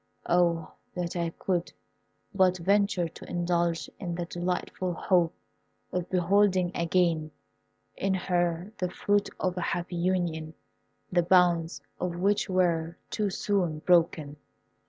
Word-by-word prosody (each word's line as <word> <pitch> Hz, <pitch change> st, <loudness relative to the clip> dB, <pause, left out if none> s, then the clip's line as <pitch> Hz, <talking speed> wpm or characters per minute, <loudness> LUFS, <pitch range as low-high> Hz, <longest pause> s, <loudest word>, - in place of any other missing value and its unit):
Oh, 170 Hz, -2 st, +2 dB, 0.2 s
that 175 Hz, -1 st, -3 dB
I 170 Hz, -1 st, 0 dB
could 175 Hz, +1 st, -2 dB, 0.6 s
but 185 Hz, -2 st, +3 dB
venture 195 Hz, 0 st, +2 dB
to 165 Hz, -, -12 dB
indulge 170 Hz, -1 st, 0 dB
in 175 Hz, -3 st, -3 dB
the 175 Hz, 0 st, -3 dB
delightful 180 Hz, +1 st, -3 dB
hope 175 Hz, 0 st, +2 dB, 0.6 s
of 180 Hz, -1 st, -2 dB
beholding 185 Hz, 0 st, +3 dB
again 170 Hz, -2 st, +1 dB, 0.7 s
in 195 Hz, 0 st, 0 dB
her 175 Hz, 0 st, -1 dB
the 180 Hz, -, 0 dB
fruit 205 Hz, +2 st, +1 dB
of 185 Hz, -1 st, 0 dB
a -, -, -1 dB
happy 175 Hz, +1 st, -2 dB
union, 170 Hz, -3 st, -1 dB, 0.6 s
the 175 Hz, -1 st, +4 dB
bonds 175 Hz, -1 st, +3 dB, 0.2 s
of 175 Hz, -1 st, -2 dB
which 200 Hz, +4 st, +1 dB
were 170 Hz, -3 st, +1 dB
too 210 Hz, -2 st, 0 dB
soon 185 Hz, -4 st, 0 dB
broken!" 160 Hz, -3 st, +2 dB
175 Hz, 125 wpm, -28 LUFS, 170-185 Hz, 0.7 s, the